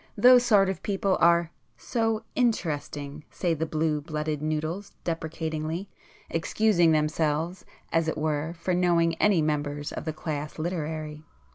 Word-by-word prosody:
Those 245 Hz, +3 st, +7 dB
sort 205 Hz, -5 st, +5 dB
of 190 Hz, -, -3 dB
people 195 Hz, -1 st, 0 dB
are 170 Hz, -1 st, +4 dB, 0.3 s
so 225 Hz, -2 st, -1 dB
'interesting' 150 Hz, -, -1 dB
say 175 Hz, -3 st, -1 dB
the 160 Hz, +1 st, -2 dB
blue 155 Hz, -1 st, 0 dB
blooded 150 Hz, -1 st, -3 dB
noodles 155 Hz, +6 st, -3 dB
deprecatingly, 160 Hz, +2 st, -3 dB, 0.4 s
excusing 175 Hz, 0 st, +2 dB
themselves 155 Hz, +3 st, 0 dB, 0.3 s
as 165 Hz, 0 st, +2 dB
it 160 Hz, -, -1 dB
were 155 Hz, +2 st, -1 dB
for 180 Hz, +2 st, -1 dB
knowing 170 Hz, -2 st, +3 dB
any 195 Hz, -6 st, +4 dB
members 145 Hz, -1 st, -2 dB
of -, -, -6 dB
the 155 Hz, -, -2 dB
class 150 Hz, -1 st, -5 dB
literary. 155 Hz, -2 st, -4 dB
160 Hz, 135 wpm, -27 LUFS, 155-180 Hz, 0.4 s, Those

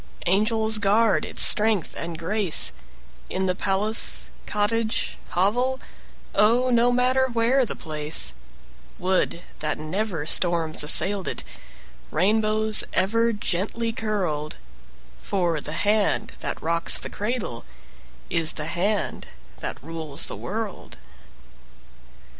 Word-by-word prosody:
Angels 220 Hz, +3 st, +2 dB
guard 210 Hz, +2 st, +3 dB
its -, -, +2 dB
strength 215 Hz, -4 st, +5 dB
and 170 Hz, -1 st, -5 dB
grace, 180 Hz, -, +2 dB, 0.6 s
In 190 Hz, 0 st, -1 dB
the 185 Hz, -, +1 dB
palace, 205 Hz, +4 st, 0 dB, 0.2 s
cottage, 215 Hz, +2 st, -1 dB
hovel, 245 Hz, +8 st, +1 dB, 0.5 s
Oh, 235 Hz, +5 st, +3 dB
no 240 Hz, 0 st, +4 dB
matter 255 Hz, +2 st, +2 dB
where 240 Hz, +2 st, +2 dB
the -, -, -5 dB
place; 150 Hz, -, 0 dB, 0.6 s
Would 180 Hz, -1 st, 0 dB, 0.2 s
that 155 Hz, 0 st, -2 dB
never 165 Hz, +1 st, -3 dB
storms 165 Hz, -2 st, +2 dB
assailed 190 Hz, +5 st, +3 dB
it, -, -, -3 dB, 0.7 s
Rainbows 215 Hz, +4 st, +2 dB
ever 230 Hz, +5 st, +2 dB
gently 215 Hz, +3 st, -2 dB
curled; 185 Hz, -10 st, -2 dB, 0.6 s
For 175 Hz, -6 st, -1 dB
the 150 Hz, -, -7 dB
hand 205 Hz, +4 st, +1 dB
that -, -, -4 dB
rocks 170 Hz, +1 st, +1 dB
the -, -, -3 dB
cradle 210 Hz, -, -4 dB, 0.6 s
Is 165 Hz, -2 st, +1 dB
the 150 Hz, -, -4 dB
hand 195 Hz, +6 st, -1 dB, 0.3 s
that -, -, -5 dB
rules 160 Hz, -2 st, -3 dB
the -, -, -6 dB
world. 215 Hz, -1 st, -6 dB
205 Hz, 110 wpm, -24 LUFS, 170-220 Hz, 0.7 s, strength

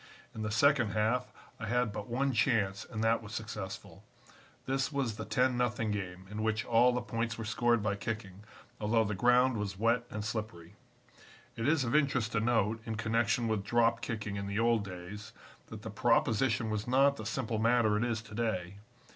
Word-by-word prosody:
In 110 Hz, -, -6 dB
the 110 Hz, -, -2 dB
second 120 Hz, 0 st, +3 dB
half 120 Hz, +4 st, 0 dB, 0.3 s
I 110 Hz, -, -5 dB
had 120 Hz, -1 st, +1 dB
but 105 Hz, -1 st, -5 dB
one 130 Hz, +3 st, 0 dB
chance 105 Hz, -5 st, +1 dB
and 110 Hz, -2 st, -3 dB
that 115 Hz, +1 st, +2 dB
was 110 Hz, -1 st, -10 dB
successful. 100 Hz, -3 st, -7 dB, 0.6 s
This 135 Hz, +2 st, 0 dB
was 135 Hz, -6 st, -1 dB
the 110 Hz, -, -6 dB
10 125 Hz, +3 st, +1 dB
0 125 Hz, 0 st, +3 dB, 0.2 s
game, 95 Hz, -2 st, -5 dB
in 105 Hz, +1 st, -4 dB
which 110 Hz, +1 st, 0 dB
all 120 Hz, +1 st, +5 dB
the 125 Hz, 0 st, -2 dB
points 115 Hz, 0 st, -2 dB
were 115 Hz, -, -5 dB
scored 120 Hz, 0 st, +1 dB
by 105 Hz, -2 st, 0 dB
kicking, 105 Hz, -2 st, -5 dB, 0.4 s
although 110 Hz, +1 st, +2 dB
the 105 Hz, -1 st, -2 dB
ground 125 Hz, +4 st, +3 dB
was 100 Hz, -2 st, -3 dB
wet 115 Hz, +3 st, +2 dB
and 105 Hz, -1 st, -5 dB
slippery. 105 Hz, -6 st, -5 dB, 0.8 s
"It 115 Hz, 0 st, -2 dB
is 155 Hz, -2 st, +3 dB
of 115 Hz, -, -2 dB
interest 130 Hz, -7 st, +2 dB
to 115 Hz, -, +1 dB
note, 115 Hz, -1 st, +1 dB
in 110 Hz, 0 st, -4 dB
connection 115 Hz, +1 st, +1 dB
with 110 Hz, -3 st, 0 dB
drop 115 Hz, +2 st, +2 dB
kicking 110 Hz, -5 st, -4 dB
in 100 Hz, 0 st, -4 dB
the 100 Hz, +1 st, -3 dB
old 115 Hz, -1 st, +3 dB
days, 100 Hz, +3 st, -8 dB, 0.3 s
that -, -, -9 dB
the -, -, -6 dB
proposition 115 Hz, 0 st, +2 dB
was 105 Hz, +1 st, -2 dB
not 135 Hz, +2 st, +4 dB
the -, -, -6 dB
simple 115 Hz, -4 st, -2 dB
matter 115 Hz, -1 st, +3 dB
it 105 Hz, -, +1 dB
is 115 Hz, -2 st, -1 dB
to 110 Hz, 0 st, -13 dB
day. 100 Hz, -5 st, -2 dB
110 Hz, 195 wpm, -31 LUFS, 105-120 Hz, 0.8 s, all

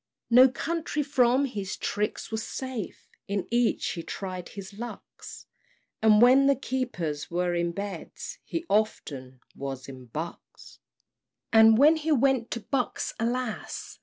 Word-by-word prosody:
No 255 Hz, +2 st, +8 dB
county 320 Hz, +2 st, -2 dB
from 265 Hz, -1 st, +3 dB
his 205 Hz, -7 st, -4 dB
tricks 210 Hz, +2 st, -2 dB
was 220 Hz, 0 st, -2 dB
safe; 255 Hz, -4 st, -6 dB, 0.2 s
In 200 Hz, -1 st, -2 dB
each 240 Hz, 0 st, +1 dB
he 170 Hz, -, -4 dB
tried 185 Hz, 0 st, -6 dB
his 200 Hz, -1 st, -9 dB
lucks, 235 Hz, +4 st, -9 dB, 0.6 s
And 215 Hz, -1 st, +6 dB
when 265 Hz, +3 st, +6 dB
the 280 Hz, -, +5 dB
keepers 240 Hz, -, -3 dB
were 175 Hz, +1 st, 0 dB
in 170 Hz, 0 st, 0 dB
Beds, 200 Hz, -1 st, -6 dB
He 335 Hz, 0 st, -4 dB
often 135 Hz, -, -1 dB
was 135 Hz, -1 st, -6 dB
at 130 Hz, -3 st, -11 dB
Bucks. 165 Hz, +5 st, -8 dB, 0.7 s
And 220 Hz, 0 st, +8 dB
when 300 Hz, +5 st, +6 dB
he 315 Hz, +1 st, -2 dB
went 265 Hz, -4 st, +2 dB
to 235 Hz, -, -4 dB
Bucks, 255 Hz, +1 st, -2 dB
alas! 235 Hz, 0 st, -3 dB
220 Hz, 135 wpm, -27 LUFS, 180-260 Hz, 0.7 s, No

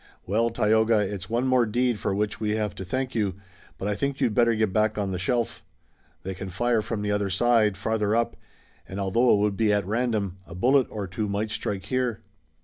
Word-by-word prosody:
Well, 115 Hz, +5 st, +1 dB
Tayoga, 110 Hz, 0 st, +3 dB
it's 100 Hz, -2 st, -2 dB
one 120 Hz, +3 st, 0 dB
more 130 Hz, -3 st, +3 dB
deed 120 Hz, 0 st, +1 dB
for 95 Hz, -, -1 dB
which 105 Hz, 0 st, -1 dB
we 105 Hz, -1 st, 0 dB
have 105 Hz, -3 st, -1 dB
to -, -, -7 dB
thank 130 Hz, +7 st, -2 dB
you, 105 Hz, -5 st, 0 dB, 0.4 s
but 95 Hz, -, -4 dB
I 105 Hz, -, +1 dB
think 140 Hz, +5 st, -2 dB
you'd 110 Hz, -, +1 dB
better 120 Hz, 0 st, +3 dB
get 110 Hz, -3 st, 0 dB
back 110 Hz, 0 st, +2 dB
on 100 Hz, -2 st, -1 dB
the 90 Hz, -, -3 dB
shelf. 115 Hz, +2 st, -1 dB, 0.6 s
They 95 Hz, -, -4 dB
can 95 Hz, +1 st, -7 dB
fire 120 Hz, +4 st, +1 dB
from 105 Hz, -1 st, -4 dB
the 105 Hz, -, 0 dB
other 105 Hz, -1 st, 0 dB
side, 110 Hz, 0 st, +3 dB
farther 105 Hz, 0 st, 0 dB
up, 115 Hz, 0 st, 0 dB, 0.5 s
and 95 Hz, -, -6 dB
although 115 Hz, +6 st, +3 dB
it -, -, +2 dB
would 100 Hz, 0 st, +1 dB
be 110 Hz, -2 st, +3 dB
at 105 Hz, -2 st, +1 dB
random, 105 Hz, -3 st, -1 dB
a 85 Hz, -, -9 dB
bullet 130 Hz, +7 st, +3 dB
or 105 Hz, -2 st, -4 dB
two 100 Hz, +3 st, -3 dB
might 105 Hz, +2 st, -2 dB
strike 105 Hz, -3 st, -3 dB
here." 125 Hz, -1 st, -1 dB
105 Hz, 220 wpm, -26 LUFS, 100-115 Hz, 0.6 s, Tayoga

